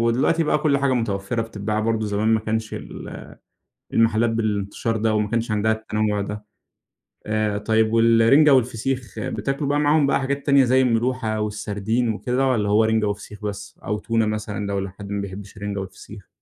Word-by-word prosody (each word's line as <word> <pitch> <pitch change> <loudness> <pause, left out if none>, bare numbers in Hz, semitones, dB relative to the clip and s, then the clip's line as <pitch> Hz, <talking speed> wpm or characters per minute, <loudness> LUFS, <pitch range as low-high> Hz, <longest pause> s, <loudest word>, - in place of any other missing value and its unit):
ودلوقتي 125 +8 +2
بقى 150 - +2
كل 145 -2 +2
حاجة 135 -1 +1
متوفرة 115 -1 -1
بتتباع، 110 -1 -3
برضو 110 -1 0
زمان 105 +2 0
ما 110 -1 +3
كانش 110 0 -3
ال - - -8 0.6
المحلات 115 0 +3
بالانتشار 110 0 -1
ده، 110 0 +1
وما 105 -1 +1
كانش 115 -1 -1
عندها 110 +1 +2
التنوع 110 -1 -1
ده. 105 +1 -5 0.8
آآ 105 -1 0
طيب 110 +1 +1
والرنجة 115 +6 +5
والفسيخ 125 0 0
بتاكلوا 140 +1 -2
بقى 145 +1 +2
معاهم 150 0 +3
بقى - - +2
حاجات 140 +1 -2
تانية 140 -1 +5
زي 130 +1 +3
الملوحة 120 -2 0
والسردين 105 +3 -1
وكده، 125 +5 0
والّا 110 -5 +1
هو 105 +2 +4
رنجة 110 -1 +2
وفسيخ 105 0 -6
بس، 100 -1 -6
أو 105 - -2
تونة 115 -1 0
مثلًا 105 -1 -3
لو 100 -1 -1
لحد 100 +1 -7
ما 100 - -1
بيحبش 100 +1 -8
الرنجة 100 -1 -4
والفسيخ؟ 95 +1 -10
110 Hz, 170 wpm, -22 LUFS, 105-120 Hz, 0.8 s, والرنجة